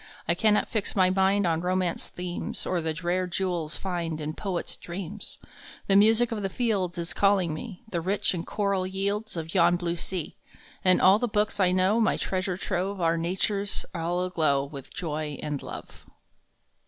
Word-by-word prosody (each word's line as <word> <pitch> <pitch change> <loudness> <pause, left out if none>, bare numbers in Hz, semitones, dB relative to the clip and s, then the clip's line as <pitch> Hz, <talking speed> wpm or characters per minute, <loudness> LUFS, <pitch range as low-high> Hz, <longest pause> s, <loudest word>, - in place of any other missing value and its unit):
I 170 - +4
cannot 210 +4 +3
fix 215 -3 -1
my 185 -2 +4
mind 195 +1 +3
On 165 -1 +1
Romance 180 -1 0
themes, 180 -1 -5
Or 180 -2 0
the 160 -1 -2
rare 180 +1 +1
jewels 175 -3 -2
find 170 -4 -3
In 155 0 -3
poets 185 -1 -3
dreams. 190 +3 -7 0.5
The 195 - +3
music 225 +4 +5
of 220 -2 -2
the 195 - -1
fields 195 -5 -1
Is 170 0 -2
calling 195 -5 +3
me 190 +5 -7
The 175 -6 -2
rich 200 +3 +1
and 170 -2 -3
choral 200 -1 0
yields 200 +2 -2
Of 165 0 -5
yon 175 -1 +5
blue 175 -1 -2
sea; 180 -2 -3 0.5
And 185 -2 +6
all 190 +3 +6
the 245 - 0
books 210 -1 0
I 185 -2 +4
know, 185 +5 +3
My 220 - +3
treasure 185 -1 -1
trove, 190 +1 -2
Are 165 -1 +2
Nature 185 +4 0
s 200 -1 -3
all 175 +1 -1
aglow 155 -6 +1
With 140 -2 -10
joy 155 -3 -3
and 150 -2 -3
love. - - -9
185 Hz, 180 wpm, -27 LUFS, 170-200 Hz, 0.5 s, And